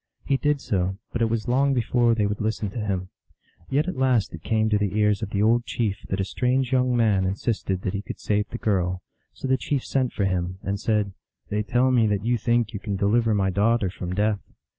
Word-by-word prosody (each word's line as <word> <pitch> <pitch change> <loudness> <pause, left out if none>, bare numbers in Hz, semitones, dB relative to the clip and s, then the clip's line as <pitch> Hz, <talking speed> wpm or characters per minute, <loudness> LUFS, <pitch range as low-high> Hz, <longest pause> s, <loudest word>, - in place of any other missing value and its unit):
He 140 - +2
did 145 +1 +1
so, 95 -1 -1 0.2
but 115 - -2
it 115 - +3
was 115 +1 -2
long 135 +3 +2
before 120 -1 +2
they 105 -2 +1
would 100 +1 -2
listen 105 -2 -1
to 115 - -5
him. 95 -3 -2 0.6
Yet 145 +5 +1
at 185 - -2
last 130 -5 +2
it 85 - -8
came 110 +4 +1
to 105 - +3
the 105 0 -1
ears 105 -1 +2
of 110 - -3
the 100 0 0
old 120 +2 +3
chief 110 -6 -1
that 95 - -1
a 95 - +1
strange 125 +4 0
young 125 -1 +2
man 105 -5 +3
insisted 95 0 -2
that 95 - -2
he 100 - -2
could - - -8
save 105 0 0
the - - -5
girl; 90 -4 0 0.3
so - - -6
the 130 0 +3
chief 135 +1 -2
sent 130 -3 0
for 100 - -1
him, 90 -1 -1
and 100 +1 -2
said, 105 -2 0 0.4
"They 105 +1 0
tell 125 +4 +2
me 120 -3 +4
that 105 0 -1
you 120 0 +1
think 115 -1 +1
you 100 - -4
can 100 -1 -3
deliver 110 +3 +2
my 95 -2 +1
daughter 105 0 +2
from 90 -1 -5
death. 105 0 +1
105 Hz, 235 wpm, -25 LUFS, 100-120 Hz, 0.6 s, me